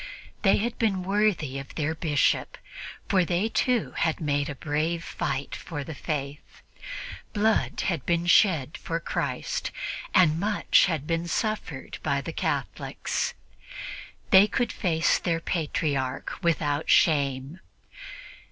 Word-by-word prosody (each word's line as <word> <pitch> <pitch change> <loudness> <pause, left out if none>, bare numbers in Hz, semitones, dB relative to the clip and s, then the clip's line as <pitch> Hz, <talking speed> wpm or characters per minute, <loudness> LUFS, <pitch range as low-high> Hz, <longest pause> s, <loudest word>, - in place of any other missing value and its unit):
They 195 - +5
had 235 +3 -2
been 195 -5 +1
worthy 190 -8 +1
of 135 - -10
their 155 0 0
Bishop, 155 -4 +1 0.5
for 185 -2 +3
they 180 +5 0
too 245 0 +1
had 165 -1 0
made 145 -2 0
a 140 - -4
brave 155 +4 -1
fight 140 -3 -3
for 145 -4 -6
the 160 - -7
Faith. 145 -1 -5 0.7
Blood 220 +1 +1
had 165 -8 -1
been 170 0 +1
shed 170 -6 +4
for 165 0 -2
Christ, - - -2 0.5
and 165 -5 +5
much 205 +1 +3
had 160 -5 -2
been 165 +1 -1
suffered 215 +5 -3
by - - 0
the - - -6
Catholics; - - -2 1.0
they 195 0 +8
could 240 +1 0
face 165 -4 +1
their 165 -2 0
Patriarch 145 -6 -1
without 155 -4 0
shame. 140 0 +3
165 Hz, 125 wpm, -27 LUFS, 145-190 Hz, 1.0 s, they